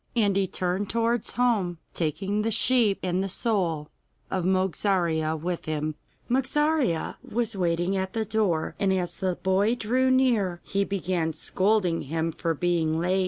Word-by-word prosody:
And 205 Hz, -4 st, +2 dB
he 195 Hz, -1 st, +2 dB
turned 185 Hz, +3 st, -2 dB
towards 230 Hz, 0 st, 0 dB
home, 215 Hz, -8 st, +1 dB, 0.2 s
taking 195 Hz, +6 st, -1 dB
his 225 Hz, -1 st, +1 dB
sheep 230 Hz, -4 st, +3 dB
and 185 Hz, +1 st, 0 dB
the 195 Hz, -, -3 dB
soul 175 Hz, -8 st, 0 dB, 0.4 s
of 185 Hz, -2 st, -1 dB
Mogarzea 180 Hz, -4 st, +1 dB
with 175 Hz, +2 st, -4 dB
him. 155 Hz, 0 st, -2 dB, 0.3 s
Mogarzea 265 Hz, -, +1 dB
was 230 Hz, -1 st, -2 dB
waiting 175 Hz, +1 st, 0 dB
at 190 Hz, 0 st, -2 dB
the 225 Hz, -1 st, -1 dB
door, 200 Hz, -7 st, 0 dB
and 200 Hz, -2 st, +2 dB
as 180 Hz, -2 st, -1 dB
the 185 Hz, -2 st, -1 dB
boy 195 Hz, +6 st, +2 dB
drew 250 Hz, +3 st, +1 dB
near 235 Hz, -9 st, +2 dB
he 200 Hz, 0 st, 0 dB
began 180 Hz, -4 st, -1 dB
scolding 185 Hz, +1 st, +1 dB
him 165 Hz, +1 st, -1 dB
for 165 Hz, 0 st, -2 dB
being 170 Hz, -1 st, +1 dB
so -, -, 0 dB
late. 180 Hz, +3 st, +1 dB
190 Hz, 160 wpm, -26 LUFS, 170-220 Hz, 0.4 s, sheep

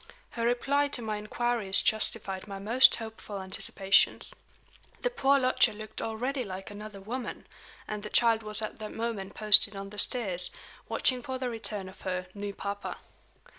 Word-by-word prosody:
Her 230 Hz, 0 st, -1 dB
reply 280 Hz, +4 st, +2 dB
to -, -, -7 dB
my 215 Hz, -1 st, -2 dB
inquiries 215 Hz, -2 st, 0 dB
justified 210 Hz, -3 st, 0 dB
my 200 Hz, -1 st, -6 dB
most 225 Hz, +6 st, +6 dB
hopeful 220 Hz, -2 st, -7 dB
anticipations. 190 Hz, +1 st, +2 dB, 0.7 s
The -, -, +1 dB
poor 280 Hz, -, +3 dB
lodger 255 Hz, -3 st, +3 dB
looked 215 Hz, 0 st, -8 dB
already 250 Hz, +4 st, -2 dB
"like 195 Hz, -1 st, -7 dB
another 210 Hz, 0 st, -8 dB
woman"; 235 Hz, +6 st, -6 dB, 0.4 s
and 210 Hz, -1 st, -4 dB
the 210 Hz, -, -6 dB
child 230 Hz, -1 st, +4 dB
was 215 Hz, 0 st, 0 dB
at 215 Hz, -, -5 dB
that 215 Hz, -1 st, -6 dB
moment 225 Hz, -4 st, -4 dB
posted 210 Hz, -1 st, +6 dB
on 195 Hz, 0 st, -7 dB
the 210 Hz, -, -3 dB
stairs, 195 Hz, -9 st, +2 dB, 0.4 s
watching 255 Hz, -1 st, +1 dB
for 260 Hz, +1 st, -4 dB
the 255 Hz, -1 st, -3 dB
return 215 Hz, -4 st, -5 dB
of 185 Hz, +1 st, -13 dB
her 185 Hz, -1 st, -3 dB
"new 205 Hz, 0 st, -4 dB
papa." 200 Hz, 0 st, -5 dB
215 Hz, 165 wpm, -29 LUFS, 200-240 Hz, 0.7 s, most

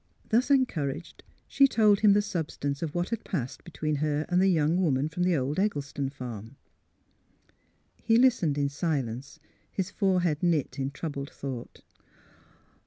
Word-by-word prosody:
Thus 240 Hz, +5 st, +2 dB
encouraged, 170 Hz, -, 0 dB, 0.3 s
she 275 Hz, 0 st, +5 dB
told 210 Hz, -5 st, +4 dB
him 210 Hz, -2 st, +6 dB
the 205 Hz, +1 st, +3 dB
substance 155 Hz, -7 st, -3 dB
of 160 Hz, -2 st, -4 dB
what 175 Hz, 0 st, -1 dB
had 230 Hz, -1 st, -3 dB
passed 130 Hz, -, -4 dB
between 155 Hz, -4 st, -3 dB
her 150 Hz, +1 st, 0 dB
and 180 Hz, +1 st, +3 dB
the 190 Hz, -, +4 dB
young 165 Hz, 0 st, +2 dB
woman 145 Hz, -4 st, +1 dB
from 180 Hz, +2 st, -5 dB
the 180 Hz, -1 st, +3 dB
old 140 Hz, +5 st, -1 dB
Eggleston 145 Hz, -8 st, -1 dB
farm. 120 Hz, -3 st, -8 dB, 1.5 s
He 225 Hz, 0 st, +3 dB
listened 230 Hz, -, +3 dB
in 145 Hz, -1 st, +1 dB
silence, 140 Hz, -4 st, -3 dB, 0.3 s
his 190 Hz, -1 st, -3 dB
forehead 180 Hz, -6 st, +1 dB
knit 165 Hz, -6 st, 0 dB
in 135 Hz, 0 st, -1 dB
troubled 140 Hz, -1 st, -5 dB
thought. 130 Hz, -4 st, -7 dB
155 Hz, 150 wpm, -28 LUFS, 140-190 Hz, 1.5 s, him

